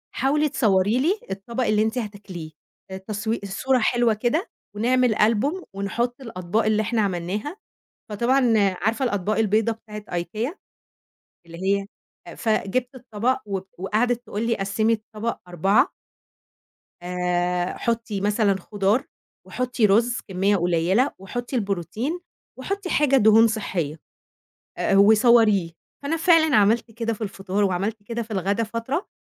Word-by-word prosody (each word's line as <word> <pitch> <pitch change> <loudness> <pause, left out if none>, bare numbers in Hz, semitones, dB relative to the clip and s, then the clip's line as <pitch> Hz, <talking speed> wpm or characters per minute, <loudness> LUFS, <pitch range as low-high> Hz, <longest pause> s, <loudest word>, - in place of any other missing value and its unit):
حاولي 295 +4 +1
تصوري 215 -4 +2
لي 355 +10 +1
الطبق 230 +6 -3
اللي 215 -2 +2
أنتِ 220 +3 -2
هتاكليه. 200 -8 -6 0.4
آآ 190 - -4
تصوي 215 +3 -3
الصورة 250 +7 0
حلوة 240 0 +2
كده، 240 - -1 0.3
ونعمل 245 +1 +2
ألبوم، 230 - +1
ونحط 235 +6 -2
الأطباق 215 -3 -2
اللي 215 0 +2
إحنا 225 +1 0
عملناها." 200 - -3 0.5
فطبعًا 240 +3 +2 0.3
عارفة 225 +6 0
الأطباق 205 -2 -1
البيضا 220 +1 +2
بتاعِة 215 -2 -9 0.2
IKEA، 220 - -4 0.9
اللي 170 0 -11 0.2
هي 200 - -6 0.5
فجبت 235 +4 -1
الطبق، 245 0 -1
وب 195 -2 -4
وقعدت 225 +6 0
تقول 215 +2 -3
لي 230 - +1
قسّمي 200 +3 0
الطبق 220 +1 -3
4 195 +6 +2 1.1
آآ 180 0 -1
حُطّي 230 -4 -2
مثلًا 205 0 +2
خُضار، 205 +5 0 0.4
وحُطّي 250 -2 0
رز 230 +4 +2
كمية 195 +1 +1
قليّلة، 180 - +2
وحُطّي 240 +7 -5
البروتين، 215 - -2 0.4
وحُطّي 395 -2 -4
حاجة 285 -4 +3
دهون 220 0 +6
صحّية، 180 -8 -3 0.8
آآ 195 - +1
وصوريه. 215 -3 +5 0.3
فأنا 305 +4 -1
فعلًا 325 -3 +4
عملت 220 +3 +3
كده 230 0 -2
في 220 - -11
الفطار، 195 -1 -2
وعملت 200 +3 -1
كده 235 +3 -4
في 225 0 -9
الغدا 200 +2 0
فترة، 230 - -3
220 Hz, 130 wpm, -23 LUFS, 195-240 Hz, 1.1 s, دهون